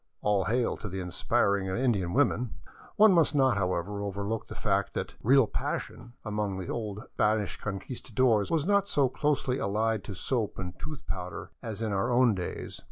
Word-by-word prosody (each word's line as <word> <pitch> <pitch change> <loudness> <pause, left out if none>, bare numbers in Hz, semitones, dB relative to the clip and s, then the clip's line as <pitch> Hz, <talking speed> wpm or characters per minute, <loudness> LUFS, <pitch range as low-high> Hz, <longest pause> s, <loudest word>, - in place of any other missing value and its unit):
All 100 -3 +2
hail 120 +3 +1
to 105 - -6
the 95 +1 -4
inspiring 95 +2 +1
Indian 100 -3 +1
women! 120 +4 +1 0.4
One 215 -1 +7
must 165 -3 +3
not, 130 -4 +4
however, 100 +1 -1
overlook 100 +2 -3
the - - -8
fact 100 -1 0
that - - -3
" - - -22
real 135 +2 +5
passion 120 +2 -4
" - - -37
among 105 -2 -2
the 95 - -5
old 105 -3 -4
Spanish 105 -2 +1
Conquistadores 110 +1 0
was 160 -3 +1
not 200 0 +3
so 140 -8 +2
closely 135 -1 0
allied 110 +1 0
to 100 - -6
soap 115 +1 -1
and 90 -2 -4
tooth 155 -3 -7
powder 90 -1 -5
as 110 -1 -5
in 110 -2 -1
our 100 +5 +1
own 120 -1 +5
days. 90 -2 -5
105 Hz, 180 wpm, -29 LUFS, 100-125 Hz, 0.4 s, One